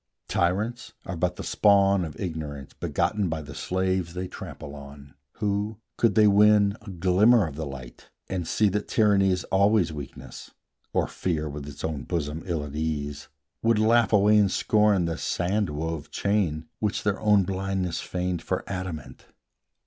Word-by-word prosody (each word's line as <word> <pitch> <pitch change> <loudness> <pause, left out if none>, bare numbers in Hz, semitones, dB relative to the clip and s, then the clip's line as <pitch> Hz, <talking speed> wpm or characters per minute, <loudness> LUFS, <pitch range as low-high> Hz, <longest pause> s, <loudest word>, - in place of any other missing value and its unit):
Tyrants 105 +8 -1
are 95 - -4
but 85 +1 -1
the - - -7
spawn 100 -2 +4
of 80 -2 -7
Ignorance, 75 -6 -5
Begotten 105 -4 -1
by 80 -1 -3
the 75 - -9
slaves 95 -2 -1
they 90 +1 -3
trample 75 -4 -9
on, 70 0 -11 0.2
Who, 105 0 -2 0.2
could 115 -4 +2
they 110 - +6
win 105 0 +5
a 110 - -10
glimmer 95 +5 +4
of 75 -4 -6
the 80 0 -4
light, 65 -3 -10 0.2
And 90 -3 -3
see 110 - +2
that 105 +2 -2
Tyranny 100 -3 +3
is 90 -1 0
always 100 -3 +3
weakness, 70 -3 -9 0.4
Or - - +1
Fear 80 -4 -2
with 70 0 -7
its 70 0 -9
own 75 -4 -3
bosom 80 -2 -3
ill 85 -4 -1
at 70 0 -8
ease, 75 -2 -3 0.3
Would 115 -1 +3
laugh 115 +2 +4
away 105 0 +5
in 100 -2 +4
scorn 105 -2 +2
the 85 -1 -3
sand 95 +2 0
wove 80 +1 -4
chain 95 -7 0
Which 105 -2 -1
their 105 -1 0
own 105 -2 +4
blindness 95 -1 -2
feigned 90 -1 -3
for - - -2
adamant. 90 -5 -6
90 Hz, 165 wpm, -26 LUFS, 80-105 Hz, 0.4 s, they